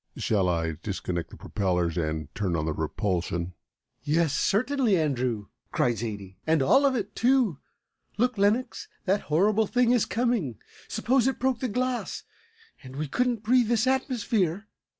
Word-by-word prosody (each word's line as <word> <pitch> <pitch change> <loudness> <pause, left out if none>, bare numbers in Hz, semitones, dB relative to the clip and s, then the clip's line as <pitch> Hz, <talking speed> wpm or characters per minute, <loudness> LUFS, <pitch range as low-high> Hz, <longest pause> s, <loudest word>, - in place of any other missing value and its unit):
Shall 100 -4 +1
I 80 -2 -1
disconnect 90 -4 -3
the - - -12
propellers 90 -5 -1
and 80 -3 -3
turn 95 -4 -1
on 80 -1 -1
the 80 - -1
repulsion?" 85 +1 -2 0.5
"Yes, 155 0 +1
certainly, 245 -1 +2
Andrew!" 125 -9 -1 0.2
cried 120 -4 +1
Zaidie, 100 -4 -6
"and 160 -3 +3
all 275 - +5
of 265 - +1
it, 205 -3 -3
too. 240 - +2 0.6
Look, 245 +3 +2
Lenox, 215 +5 +1 0.2
that 195 +1 +2
horrible 205 +7 +3
thing 245 +1 +3
is 245 -3 +3
coming. 230 - 0 0.3
Suppose 245 +3 +1
it 265 - 0
broke 260 -2 +1
the 255 - -1
glass, 250 +2 -2 0.6
and 130 -2 -11
we 150 +2 -3
couldn't 240 - 0
breathe 245 +1 +4
this 230 0 +2
atmosphere!" 225 - 0
180 Hz, 150 wpm, -27 LUFS, -, 0.6 s, all